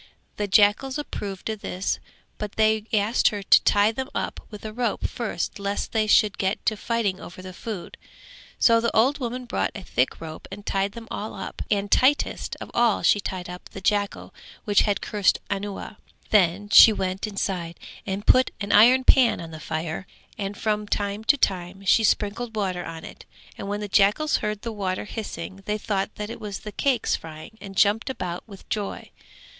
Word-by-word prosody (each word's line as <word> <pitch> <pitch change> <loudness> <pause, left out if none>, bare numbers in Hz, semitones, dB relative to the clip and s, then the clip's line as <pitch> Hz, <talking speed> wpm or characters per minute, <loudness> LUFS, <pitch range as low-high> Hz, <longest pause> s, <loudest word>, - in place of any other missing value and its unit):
The 205 - -1
jackals 210 +7 +3
approved 200 -9 -5
of 215 -2 -6
this 185 +1 -2 0.4
but 210 -1 -4
they 220 -1 +2
asked 215 +2 +3
her 205 -2 -1
to - - +6
tie 205 +1 +4
them 260 +4 -5
up - - -3
with 210 0 -10
a 215 - -5
rope 235 -2 -1
first 230 -1 -4
lest 200 0 -3
they 220 -1 +1
should 210 -1 +4
get 190 +2 -1
to 215 - +2
fighting 210 -3 -1
over 185 +1 -10
the 185 0 -8
food, 205 -1 -7 0.6
so 230 -1 +5
the 235 - +1
old 260 +7 +3
woman 250 0 -4
brought 240 - -1
a 200 - -7
thick 125 -6 0
rope 160 -1 -8
and 205 +1 -9
tied 195 +1 0
them 230 -1 -9
all 215 - -5
up 190 - -6
and 205 -1 0
tightest 275 +3 +2
of - - -8
all 235 -3 +2
she 205 - +4
tied 185 -2 -5
up 180 0 -9
the - - -8
jackal 205 +1 -1 0.3
which 205 -2 +4
had 200 - 0
cursed 205 -3 +1
Anuwa; 200 +1 -4 0.3
then 200 0 +3
she 220 - +10
went 190 0 -2
inside 185 -4 -3 0.2
and 195 +2 -4
put 255 0 +5
an 200 -1 -3
iron 250 +5 +7
pan 255 -2 +5
on 165 -1 -8
the 160 - -8
fire 160 +4 -4 0.3
and 200 0 -4
from 210 -1 -1
time 205 +1 -2
to 285 - +5
time 190 -3 -1
she 225 - +5
sprinkled 220 +3 0
water 185 -4 -1
on 165 -1 -7
it - - -11 0.3
and - - -7
when 205 +1 -2
the 210 - -3
jackals 205 +10 +3
heard 210 -1 -3
the 230 - -3
water 195 -3 -3
hissing 195 -3 -6
they 210 0 0
thought 200 -1 -2
that 210 +1 -5
it - - -8
was 205 -2 -5
the 210 - -7
cakes 255 +2 +1
frying 155 +6 -10
and 195 -1 -9
jumped 210 +5 +3
about 180 -9 -4
with 200 -3 -13
joy. 205 -2 -4
205 Hz, 195 wpm, -25 LUFS, 195-220 Hz, 0.6 s, she